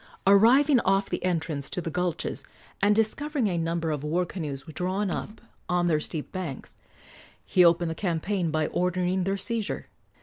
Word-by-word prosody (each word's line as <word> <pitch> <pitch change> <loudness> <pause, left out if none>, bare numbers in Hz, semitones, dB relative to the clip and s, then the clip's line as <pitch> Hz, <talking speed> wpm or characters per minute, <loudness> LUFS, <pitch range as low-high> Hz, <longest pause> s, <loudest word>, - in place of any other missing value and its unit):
Arriving 245 +8 +6
off 195 -1 +1
the - - -2
entrance 160 -5 -1
to - - -3
the 165 -1 -4
gulches, 180 0 -2 0.4
and 205 +1 +4
discovering 265 +5 0
a 180 - -1
number 165 -1 -1
of 150 -2 -3
war 170 +4 0
canoes 150 -6 -5
drawn 185 +4 -2
up 210 - -5 0.3
on 180 0 +2
their 160 -3 +2
steep 155 0 -5
banks, 180 -8 -6 0.7
he 180 - +4
opened 170 -1 +4
the - - -2
campaign 175 +1 -1
by 155 0 0
ordering 180 +2 0
their 195 +1 0
seizure. 225 +1 -2
180 Hz, 165 wpm, -27 LUFS, 165-200 Hz, 0.7 s, Arriving